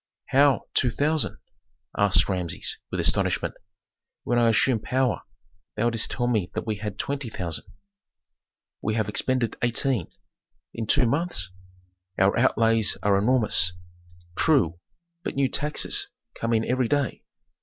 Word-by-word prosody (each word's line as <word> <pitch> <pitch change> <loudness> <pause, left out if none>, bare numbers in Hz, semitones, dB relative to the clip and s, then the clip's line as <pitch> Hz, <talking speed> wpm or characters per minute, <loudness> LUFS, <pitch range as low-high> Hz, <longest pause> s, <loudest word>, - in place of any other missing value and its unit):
"How, 140 0 +4
two 125 - +3
thousand?" 150 +7 0 0.6
asked 95 -4 +4
Rameses, 90 -4 -2
with - - -3
astonishment. - - +1 0.7
"When 120 0 +1
I 115 -1 +4
assumed 115 0 +2
power 130 0 0 0.5
thou 120 +3 +1
didst 115 -1 -1
tell 120 - -2
me 110 -7 0
that - - -3
we 110 -2 -2
had 105 -1 -5
twenty 140 -1 -3
thousand." 85 -6 -5 1.2
"We 110 0 -1
have 110 -3 0
expended 120 +2 0
eighteen." 120 - 0 0.7
"In 115 -1 -4
two 140 +2 +3
months?" 140 - 0 0.7
"Our 95 +1 +3
outlays 115 -3 +2
are 100 -1 +3
enormous." 105 -5 +4 0.6
"True, 110 - +2 0.4
but - - -5
new 135 -1 +2
taxes 150 +4 -1 0.3
come 115 - -3
in 110 0 +2
every 125 -1 +1
day." 145 +1 -1
115 Hz, 135 wpm, -25 LUFS, 105-130 Hz, 1.2 s, How